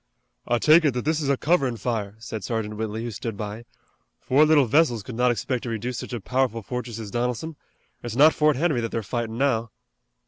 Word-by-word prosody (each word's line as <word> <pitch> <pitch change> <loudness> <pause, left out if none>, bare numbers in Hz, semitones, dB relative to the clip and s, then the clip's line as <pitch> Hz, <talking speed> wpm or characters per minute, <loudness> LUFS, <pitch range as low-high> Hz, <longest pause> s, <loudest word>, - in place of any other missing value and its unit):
"I 120 - +2
take 155 +7 +6
it 145 -5 +2
that 125 - -2
this 155 0 +1
is 140 - -1
a 140 - +2
coverin' 140 -7 +1
fire," 105 -2 -3
said 110 -2 -7
Sergeant 110 0 -3
Whitley, 110 +1 -4
who 120 - -4
stood 110 0 -5
by. 105 +2 -6 0.5
"Four 145 +4 +4
little 150 -3 +5
vessels 120 -4 +2
could 125 - -8
not 125 +2 +2
expect 120 +1 -1
to 120 - -5
reduce 115 +2 -3
such - - -7
a 120 - -3
powerful 125 +1 -1
fortress 125 0 -5
as 110 -3 -7
Donelson. 125 +7 -2 0.5
It's 120 -2 -5
not 150 +4 +6
Fort 150 -1 +3
Henry 145 -3 +1
that 115 - -2
they're 115 - -3
fightin' 115 +1 -3
now." 120 -4 +1
120 Hz, 215 wpm, -24 LUFS, 110-135 Hz, 0.5 s, take